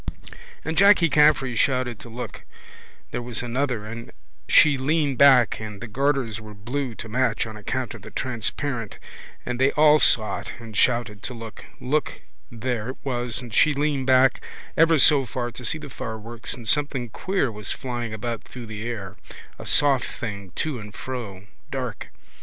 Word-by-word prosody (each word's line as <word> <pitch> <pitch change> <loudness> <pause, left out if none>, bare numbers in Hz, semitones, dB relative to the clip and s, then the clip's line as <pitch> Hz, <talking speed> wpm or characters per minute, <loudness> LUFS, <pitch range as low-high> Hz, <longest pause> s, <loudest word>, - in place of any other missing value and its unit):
And 160 - -2
Jacky 200 -4 +6
Caffrey 150 -4 +4
shouted 125 -2 +1
to 120 - -11
look, 120 +2 -7 0.7
there - - -3
was 120 0 -4
another 120 -2 -1
and 115 +2 -8 0.4
she 150 -2 +7
leaned 140 0 0
back 130 -4 +6
and 105 -2 -7
the 120 - -7
garters 130 -2 0
were 105 -1 -11
blue 120 +4 -4
to - - -7
match 125 +3 0
on 110 -1 -8
account 120 +4 -3
of 110 - -10
the - - -10
transparent 120 -1 -2 0.5
and 125 0 -3
they 135 - +5
all 150 0 +6
saw 110 -6 +4
it - - -8
and 115 -1 -10
they - - -5
all - - +6
shouted 120 -5 +1
to 125 - -6
look, 115 -1 -9
look, 150 +4 -1 0.3
there 120 -1 -3
it 130 - -6
was 125 -2 -1
and 120 -3 -10
she 150 +3 +4
leaned 140 -2 0
back 130 -1 +4 0.3
ever 165 0 +5
so 140 -2 +5
far 120 0 -3
to 125 - -9
see 125 - 0
the 150 -1 -9
fireworks 115 -2 -4
and 120 -2 -10
something 140 -2 0
queer 185 - -1
was 105 -1 -6
flying 120 -3 -4 0.2
through 125 -2 -10
the 110 -1 -7
air, 105 -5 -5 0.4
a - - -8
soft 140 -3 +3
thing, 100 -5 -6
to 150 -6 -2
and 105 -1 -10
fro, 110 -7 -6 0.2
dark. - - -4
125 Hz, 175 wpm, -24 LUFS, 110-140 Hz, 0.7 s, she